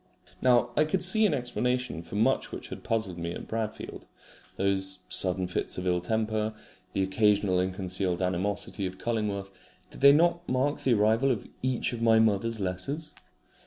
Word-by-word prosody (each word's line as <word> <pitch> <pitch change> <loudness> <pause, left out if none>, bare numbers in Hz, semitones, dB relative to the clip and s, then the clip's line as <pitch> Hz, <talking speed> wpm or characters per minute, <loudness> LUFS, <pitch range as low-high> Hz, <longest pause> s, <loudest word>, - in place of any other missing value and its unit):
Now 125 -2 +4
I 150 - +4
could 180 +4 -1
see 215 +4 +5
an 175 - 0
explanation 125 - -2
for 85 +3 -9
much 115 +6 +1
which - - -7
had - - -8
puzzled 110 -6 -2
me 85 0 -3
at - - -8
Bradfield. 110 -1 -5 0.5
Those 95 -1 0
sudden 95 0 +1
fits 90 - -2
of 90 - -4
ill 90 -1 +1
temper, 110 +2 -1 0.4
the 95 - +1
occasional 100 -1 +2
ill 90 +1 +1
concealed 95 -1 -1
animosity 95 +2 -2
of 95 0 -8
Cullingworth 105 -4 -2 0.4
did - - -12
they 140 0 +9
not 170 +3 +2
mark 130 +3 0
the 125 -3 +3
arrival 110 +5 +3
of 120 -6 -1
each 130 -1 0
of 115 - -5
my 115 -1 +5
mother's 110 +1 +2
letters? 135 - -4
110 Hz, 170 wpm, -28 LUFS, 95-125 Hz, 0.5 s, they